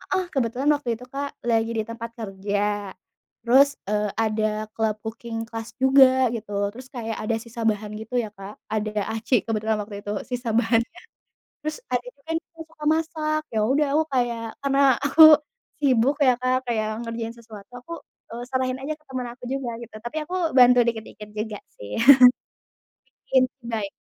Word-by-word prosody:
heeh, 375 -1 0
kebetulan 260 0 0
waktu 285 -4 -6
itu, 250 +3 -12
Kak, 280 +1 -4
lagi 230 -1 +1
di 220 - 0
tempat 230 +1 -7
kerja 205 -1 -2 0.5
terus, 275 +4 +5 0.2
eee, 210 0 0
ada 215 -1 0
club 220 -1 0
cooking 225 0 -5
class 225 0 -7
juga 260 -1 +5
gitu 225 -2 -6 0.2
terus 255 +2 -11
kayak 230 -4 -5
ada 220 +1 0
sisa 230 0 -8
bahan 210 -1 0
gitu 225 +3 -4
ya, 220 - -5
Kak, 195 +1 -10 0.2
ada 215 0 -1 0.2
aci 225 +1 +1
kebetulan 220 -1 0
waktu 205 -1 -8
itu 205 - -3
sisa 245 -1 -4
bahannya. 230 +7 +1 0.6
Terus 310 0 -3
ada 245 -1 -1
temen 320 +4 -4
aku - - -72
juga - - -15
suka 305 -2 -9
masak, 310 -1 -1
yaudah 260 +8 +2
aku 315 - +3
kayak 240 -2 0 0.2
karena 275 0 +1 0.2
aku 285 +3 +6 0.6
sibuk 265 0 +3
ya, 255 -3 +5
Kak, 255 0 +2
kayak 220 -3 0 0.2
ngerjain 230 0 -4
sesuatu 215 -2 -13
aku, 335 - -10 0.4
eee, 240 - -5
serahin 260 0 -1
aja 300 +3 -3
ke 305 - -32
temen 255 -2 -4
aku 245 +1 -12
juga 270 -2 -2
gitu, 235 - -12
tapi 240 +6 -6
aku 360 - -6 0.2
bantu 250 0 +7
dikit-dikit 220 -2 -5
juga 215 -1 -4 0.2
sih. 100 0 -6 1.3
Bikin 260 -1 +4 0.2
cibay. 225 -3 -3
235 Hz, 165 wpm, -24 LUFS, 220-260 Hz, 1.3 s, bantu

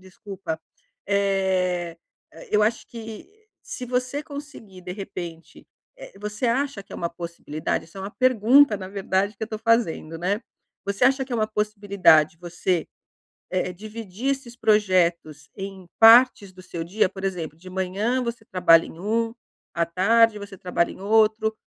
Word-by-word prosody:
Desculpa, 190 -2 -7 0.5
eh, 190 -3 0 0.5
eu 210 0 +3
acho 225 +2 0
que 225 - -9 0.3
se 255 - -7
você 255 +4 -2
conseguir 280 -11 -10
de 180 0 -6
repente, 175 -4 -8 0.3
eh, - - -11
você 210 +4 -3
acha 260 -1 0
que - - -16
é - - -6
uma 170 - -3
possibilidade, 170 -3 -4
isso 180 +4 -13
é - - -6
uma 195 +2 -5
pergunta 255 0 +4
na 190 -1 -7
verdade 195 +1 -1
que - - -10
eu 220 - -14
tô 215 - -5
fazendo, 225 -8 +1
né. 195 +5 -1 0.4
Você 200 +4 0
acha 265 +1 +3
que 255 - -9
é 240 - +1
uma 215 - +1
possibilidade 200 -7 +3
você, 175 -1 -2 0.6
eh, 185 0 -1
dividir 215 +4 -5
esses 260 -3 -5
projetos 175 -9 +1
em 195 -2 -8
partes 225 -3 +7
do 185 - -13
seu 175 -2 -7
dia? 185 +4 +1
Por 195 0 -10
exemplo 165 -5 -4
de 185 +3 -12
manhã 195 +7 -1
você 235 -1 -5
trabalha 175 -4 +5
em 165 - -11
um, 225 +3 -1 0.4
à 170 0 +1
tarde 210 +5 +3
você 200 -1 -9
trabalha 180 -1 0
em - - -12
outro, 220 +1 +3
200 Hz, 160 wpm, -24 LUFS, 180-225 Hz, 0.6 s, partes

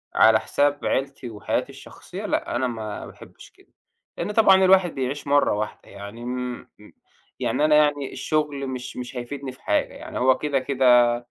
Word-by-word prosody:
على 110 0 +6
حساب 145 +3 0
عيلتي 135 -2 -2
وحياتي 105 -2 -2
الشخصية - - -10
لأ، - - -2
أنا 130 +1 0
ما 110 -3 -6
باحبش - - -14
كده - - -27 0.4
لإن 185 +5 -3
طبعًا 195 -3 +5
الواحد 185 -2 +4
بيعيش 135 +2 -3
مرّة 145 -4 +3
واحدة 105 +1 -5
يعني 100 +4 -9
م 125 0 -5 0.7
يعني 130 +6 +1
أنا 155 -1 +4
يعني 145 -2 +2
الشُغل 150 -3 -2
مش 130 -1 -6
مش 125 0 -7
هيفيدني 130 +2 -6
في 130 - -18
حاجة، - - 0
يعني - - -7
هو 130 +1 +4
كده، 145 -3 0
كده 125 -3 +4
130 Hz, 165 wpm, -24 LUFS, 120-145 Hz, 0.7 s, على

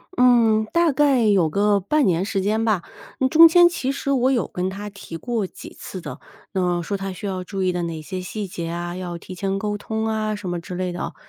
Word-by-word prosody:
嗯， 230 -3 +4
大 340 -2 +3
概 275 -5 +3
有 190 -6 +3
个 205 +3 +2
半 290 +9 +1
年 180 -1 +2
时 195 -3 -1
间 215 +3 0
吧。 210 -6 +1 0.4
那 260 - +3
中 325 +4 +9
间 345 +1 +7
其 270 -6 -2
实 275 0 -4
我 260 -1 +3
有 245 - +1
跟 180 +1 -3
他 205 +2 -6
提 195 -4 -10
过 230 0 -2
几 - - -10
次 185 - -7
的， - - -8 0.3
那 190 - 0
么 175 -1 0
说 200 +4 -3
他 195 0 -4
需 190 +2 -6
要 185 -1 -3
注 195 +1 -5
意 185 -1 +2
的 175 -1 -2
哪 165 -2 -4
些 185 +5 -5
细 200 +2 -5
节 170 -2 -5
啊， 175 +1 -4
要 175 -2 -5
提 185 +2 -10
前 195 +1 -2
沟 210 0 -2
通 220 +1 -3
啊 215 -1 -1
什 200 -3 -6
么 175 -1 -2
之 180 +1 -8
类 180 0 -2
的 175 - -6
哦。 - - -4
200 Hz, 265 characters per minute, -22 LUFS, 180-225 Hz, 0.4 s, 中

